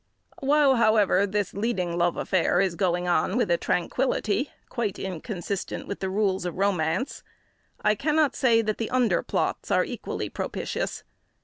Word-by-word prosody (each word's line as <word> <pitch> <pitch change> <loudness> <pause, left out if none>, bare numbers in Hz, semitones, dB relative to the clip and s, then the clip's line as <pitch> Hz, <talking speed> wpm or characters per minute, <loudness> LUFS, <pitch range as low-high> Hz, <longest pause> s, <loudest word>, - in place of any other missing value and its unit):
While, 280 -1 +4
however, 210 -3 +4
this 205 0 -1
leading 195 -5 -1
love 175 0 +1
affair 180 -1 +1
is 190 -2 +2
going 180 -1 0
on 180 +4 +1
with 240 -8 +1
a 170 - +4
tranquillity 245 - 0 0.2
quite 225 -6 -2
inconsistent 190 +1 -4
with 200 - -5
the 190 - -2
rules 190 -1 0
of 180 0 -4
romance, 195 - 0 0.6
I 210 - +4
cannot 300 +4 +1
say 230 -4 +3
that 215 -1 -2
the 225 - -2
under 255 -2 +2
plots - - -2
are - - +3
equally - - -4
propitious. - - -4
200 Hz, 150 wpm, -26 LUFS, 180-235 Hz, 0.6 s, While